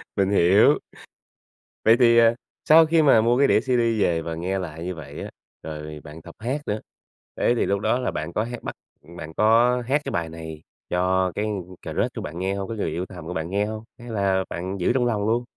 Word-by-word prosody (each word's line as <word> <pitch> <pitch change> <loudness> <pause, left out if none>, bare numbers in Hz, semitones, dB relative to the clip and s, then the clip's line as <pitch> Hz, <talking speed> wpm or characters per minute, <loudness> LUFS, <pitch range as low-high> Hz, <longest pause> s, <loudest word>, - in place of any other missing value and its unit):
Mình 95 -2 +1
hiểu. 95 +1 +5 1.1
Vậy 110 - +6
thì, 115 -2 +5
à, 115 0 +5 0.3
sau 160 +1 +7
khi 160 +1 +3
mà 135 -7 +5
mua 120 +2 +2
cái 140 +1 +4
đĩa - - +4
CD 130 -1 0 0.2
về 85 -3 +2
và 80 0 -5
nghe 90 +4 -2
lại 80 -3 -6
như 90 0 -4
vậy 70 -3 -9
á, - - -6 0.3
rồi 75 -1 -7
bạn 75 +1 -11
tập 85 +1 -13
hát 130 +7 -2
nữa. 105 +1 -1 0.6
Thế - - +2
thì - - +1
lúc 100 0 0
đó 120 +4 +1
là 125 - -1
bạn 80 +2 -5
có 105 - 0
hát 120 +1 -7
bắt - - -5 0.3
ừm, 85 +3 -15
bạn 80 -2 -8
có 115 +5 +3
hát 145 +3 +2
cái - - -3
bài 85 -1 -2
này 80 -1 -8 0.3
cho 90 +1 +1
cái 105 - -1 0.4
crush - - -2
của - - -4
bạn 85 +3 -6
nghe 95 +1 -1
hông, 100 -1 -4
cái 115 - -4
người - - -1
yêu 90 +2 -3
thầm 90 -3 -10
của - - -4
bạn 80 -1 -3
nghe 100 +2 0
hông, 110 0 -6 0.2
hay 120 - -10
là 100 -3 +1
bạn 95 +3 -4
giữ 90 - +2
trong 125 -1 +1
lòng 105 -4 0
luôn? 120 +2 +1
100 Hz, 240 wpm, -24 LUFS, 85-115 Hz, 1.1 s, sau